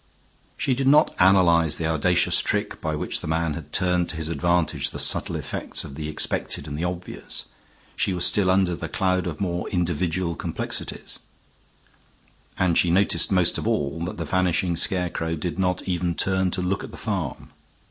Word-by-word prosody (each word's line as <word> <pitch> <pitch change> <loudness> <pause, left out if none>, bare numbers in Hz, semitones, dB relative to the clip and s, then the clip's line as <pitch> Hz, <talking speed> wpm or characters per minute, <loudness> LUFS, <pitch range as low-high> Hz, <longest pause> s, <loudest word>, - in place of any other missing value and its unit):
She 130 - +1
did 130 +1 0
not 150 +3 +5
analyze 85 -4 +5
the 85 - -2
audacious 80 -2 +2
trick - - -2
by 80 -1 -1
which - - -2
the - - -6
man 80 0 0
had 75 -1 -8
turned 90 -2 +2
to - - -4
his 80 0 -3
advantage 85 +1 +1
the - - -7
subtle - - +1
effects - - -4
of 70 - -9
the 75 +1 -5
expected 75 -1 -1
and 70 - -5
the 80 - -3
obvious; 90 0 -4 0.5
she - - 0
was 90 -1 +1
still 100 -3 +2
under 95 -1 +3
the 75 - -6
cloud 95 -1 0
of 80 -3 -5
more 90 -2 -2
individual 85 -1 -1
complexities, - - -4 1.4
and 90 -3 +3
she 90 - +3
noticed 95 +4 +2
most 90 -3 +2
of - - -3
all 75 +3 -1
that 90 - -5
the 85 - -3
vanishing 90 +1 +1
scarecrow 85 -2 0
did 85 +3 -4
not 90 -1 0
even 90 -2 -1
turn 95 0 +1
to 90 0 -2
look 95 +2 -1
at - - -7
the - - -11
farm. 95 - -4
90 Hz, 180 wpm, -24 LUFS, 80-95 Hz, 1.4 s, not